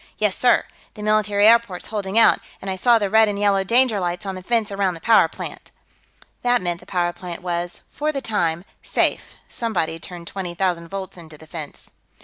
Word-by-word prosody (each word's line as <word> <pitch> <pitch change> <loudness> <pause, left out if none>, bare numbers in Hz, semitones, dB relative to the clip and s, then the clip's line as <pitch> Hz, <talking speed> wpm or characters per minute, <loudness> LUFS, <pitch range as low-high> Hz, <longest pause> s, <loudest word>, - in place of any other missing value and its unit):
"Yes, 210 -3 +1
sir. 250 - +3 0.3
The 210 - -8
military 210 -1 +3
airport's 230 -5 +3
holding 200 0 -2
out, 230 - +6 0.2
and 195 - -5
I - - -2
saw 235 +5 +4
the 205 -2 0
red 220 +2 +5
and 205 -1 -2
yellow 200 -1 +2
danger 235 +1 +3
lights 175 +2 -3
on 195 - -3
the 185 - -7
fence 225 +1 0
around 195 -2 0
the - - -9
power 225 +6 +5
plant." - - -9 0.7
That 245 0 +3
meant 175 -2 -3
the - - -18
power 175 -2 0
plant 175 0 -8
was, 175 0 -3
for 305 +1 -1
the 280 - -3
time, 175 -8 -1 0.2
safe; - - -1
somebody'd 175 -8 -2
turned 175 -2 -9
twenty 180 -1 -6
thousand 175 -2 -1
volts 190 +1 -6
into 160 -3 -12
the 160 - -15
fence. 155 -2 -9
195 Hz, 200 wpm, -22 LUFS, 175-215 Hz, 0.7 s, out